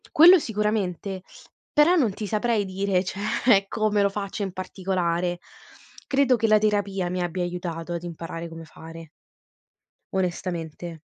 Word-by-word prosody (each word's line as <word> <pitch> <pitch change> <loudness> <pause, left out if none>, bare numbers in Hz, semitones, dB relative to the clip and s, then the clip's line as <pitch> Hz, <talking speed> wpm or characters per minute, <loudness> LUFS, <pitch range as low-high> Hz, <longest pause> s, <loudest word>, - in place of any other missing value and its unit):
Quello 350 +4 +8
sicuramente, 205 - -2 0.5
però 300 +5 +5
non 250 - +2
ti 210 - -5
saprei 215 0 0
dire 190 -1 0
cioè 200 +2 +1
come 215 -1 +1
lo 200 - +3
faccio 200 0 -4
in 195 - -3
particolare. 180 -2 -2 0.7
Credo 270 -2 +3
che 225 - +1
la 215 0 +6
terapia 205 -3 0
mi 180 0 -2
abbia 175 +1 -2
aiutato 175 -1 -4
ad 170 0 -4
imparare 165 0 -6
come 165 0 -9
fare 165 +1 -11 1.1
onestamente. 175 -3 -3
190 Hz, 135 wpm, -25 LUFS, 175-210 Hz, 1.1 s, Quello